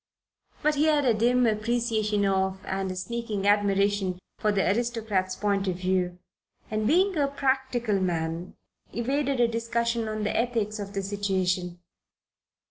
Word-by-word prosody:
But 305 - +3
he 295 +1 +2
had 300 -3 +3
a 240 - +4
dim 245 +3 +3
appreciation 215 -2 +1
of, 190 -1 0
and 190 0 -2
a 185 - -4
sneaking 215 0 -3
admiration 200 -2 +2 0.2
for, 210 - +2
the 195 -2 +1
aristocrat's 215 -3 0
point 200 -1 0
of 185 - 0
view, 180 -1 0 0.5
and, 215 0 0
being 370 - +3
a 285 -2 +3
practical 260 -6 0
man, 170 -1 -2 0.4
evaded 270 +3 0
a 240 - +5
discussion 230 0 -1
on 215 0 -3
the 210 - -1
ethics 225 -3 0
of 200 0 -6
the 195 -1 -2
situation. 185 -3 -1
210 Hz, 145 wpm, -27 LUFS, 190-235 Hz, 0.5 s, a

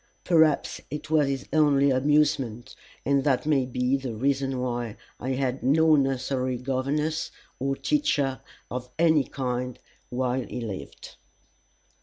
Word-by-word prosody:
Perhaps 160 -4 +3
it 150 +2 -6
was 150 -3 +4
his 135 -1 -3
only 140 -3 +4
amusement, 135 -3 +1 0.3
and 140 0 +2
that 135 -2 +1
may 140 -4 +2
be 125 +1 0
the 130 -4 -5
reason 135 +2 0
why 120 -3 -3 0.2
I 130 +2 -2
had 130 0 -1
no 155 +4 +4
nursery 130 -2 0
governess 140 +5 -1 0.3
or 135 +1 0
teacher 145 - 0 0.3
of 125 0 -5
any 160 -3 +4
kind 125 -1 -3 0.3
while 125 +1 -1
he 125 - -6
lived. 105 -5 -7
135 Hz, 130 wpm, -26 LUFS, 125-145 Hz, 0.3 s, was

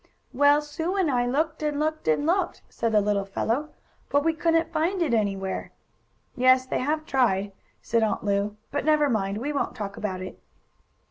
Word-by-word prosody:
"Well, 285 +3 +4
Sue 320 +5 -3
and 370 -7 +2
I 245 -1 +1
looked 310 +5 -1
and 300 -1 -1
looked 310 - -2
and 155 - +2
looked," 355 +2 0
said 230 -1 -2
the 210 -1 +4
little 205 -1 +1
fellow, 230 +9 -2 0.4
"but 285 0 +2
we 325 - +3
couldn't 330 0 +1
find 335 +5 0
it 320 -8 +1
anywhere!" 195 -3 -1 0.6
"Yes, 255 +1 +4
they - - -2
have 305 +4 -1
tried," 205 -8 +1 0.3
said 230 0 +1
Aunt 220 - 0
Lu. 205 +1 0
"But 290 - -1
never 300 -2 +3
mind, 200 -2 -1
we 285 +7 -3
won't 280 - -2
talk 200 -2 -5
about 190 -3 -3
it." 185 - -9
260 Hz, 185 wpm, -26 LUFS, 210-310 Hz, 0.6 s, Well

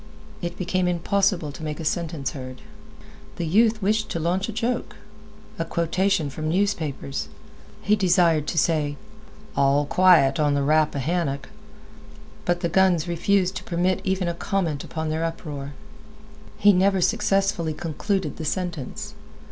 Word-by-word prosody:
It 175 0 -4
became 185 0 0
impossible 180 -2 +1
to 140 - -11
make 150 0 -4
a 165 - -5
sentence 165 -4 -2
heard. 130 +1 -8 0.7
The 175 - -3
youth 215 +5 +3
wished 215 +2 +1
to 170 - -2
launch 180 +6 0
a - - -2
joke—a 215 -3 -5
quotation 170 -1 0
from 155 +2 -3
newspapers. 160 -7 -1 0.6
He 210 - +4
desired 175 -6 +3
to - - -3
say, 150 -3 +1 0.6
"All 140 +1 +3
quiet 160 -5 +5
on 145 -1 +2
the 140 - +1
Rappahannock," 150 0 0 1.0
but 175 0 0
the 170 - +1
guns 180 -2 +3
refused 185 +2 +1
to - - -7
permit 180 +1 0
even 190 -1 0
a 170 - 0
comment 170 -5 -2
upon 160 -1 -4
their 160 +1 -1
uproar. 145 -4 -5 0.8
He 205 0 +6
never 190 +1 +3
successfully 195 -4 +1
concluded 175 +1 -2
the 160 - -5
sentence. 170 -6 -4
170 Hz, 140 wpm, -24 LUFS, 155-195 Hz, 1.0 s, He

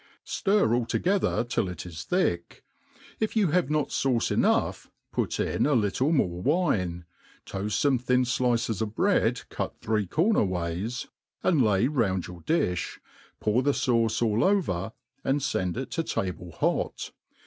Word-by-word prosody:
Stir 200 - +2
all 120 -1 +1
together 190 - +1
till 115 -5 -1
it 90 - -7
is 80 -3 -7
thick; 90 - -1 0.6
if 220 0 -1
you 205 -6 +3
have 175 -5 +2
not 150 -2 0
fauce 125 -4 +1
enough, - - +1 0.2
put - - -1
in - - +1
a 150 - +3
little 120 +6 +1
more 90 - +1
wine, 90 - 0 0.4
toaft 100 +2 -4
fome 135 -4 +2
thin 125 0 +2
flices 120 -4 0
of 110 -1 -3
bread - - +2
cut - - -4
three* 105 -3 0
corner 185 - +2
ways, 90 +5 -2 0.4
and 170 -7 +3
hy 105 -2 +3
round 110 - +1
y^^r.^difli, 90 - -2 0.4
pour 110 +4 +2
the 140 +2 +2
fauce 115 -3 +1
all 110 -1 +2
over, 110 - +1 0.3
and 135 +1 0
fend 90 -7 -1
it 130 - -4
to 165 - 0
table 90 - -3
hot. - - -1
115 Hz, 150 wpm, -27 LUFS, 95-145 Hz, 0.6 s, you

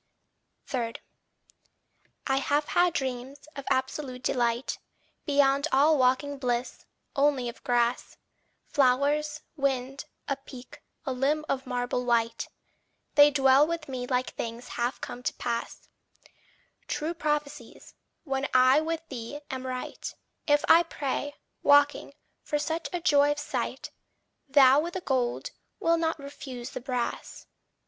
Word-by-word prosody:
3. 235 -3 -2 1.3
I 270 -1 +1
have 290 +2 +1
had 355 -1 +3
dreams 265 0 -4
of 280 - -7
absolute 260 -1 -2
delight, 240 +1 0 0.5
Beyond 280 0 +3
all 295 +4 +5
waking 260 +3 +2
bliss 245 -1 -2 0.3
only 275 -3 +2
of 235 - -8
grass, 240 0 0 0.5
Flowers, 290 +3 +2
wind, 270 -1 -1 0.2
a 275 - -1
peak, 260 -2 -12 0.2
a 265 - -1
limb 290 +4 0
of 265 -1 -2
marble 245 0 -1
white; 230 -1 +1 0.7
They 290 0 +8
dwell 270 0 +5
with 330 -2 -3
me 255 -2 -4
like 255 0 0
things 235 +2 -6
half 240 +2 -2
come 245 - -6
to - - -2
pass, 235 -1 -4 1.0
True 315 +3 -2
prophecies: 300 -3 -4 0.3
when 270 -2 -1
I 255 +3 +6
with 325 0 -3
thee 260 +3 -6
am 260 0 -4
right, 255 0 -5 0.3
If 290 -1 +3
I 335 - +8
pray, 290 -3 -3 0.3
waking, 285 0 +4 0.3
for 295 - -1
such 320 +2 -2
a 355 - -3
joy 290 -3 +4
of - - -13
sight, 295 - -4 0.6
Thou 270 -1 +7
with 340 +4 -3
the 370 - -2
gold, 255 -6 -1 0.3
wilt 335 0 +2
not 325 -1 0
refuse 270 -4 -8
the - - -6
brass. 250 -2 -4
275 Hz, 130 wpm, -28 LUFS, 250-295 Hz, 1.3 s, They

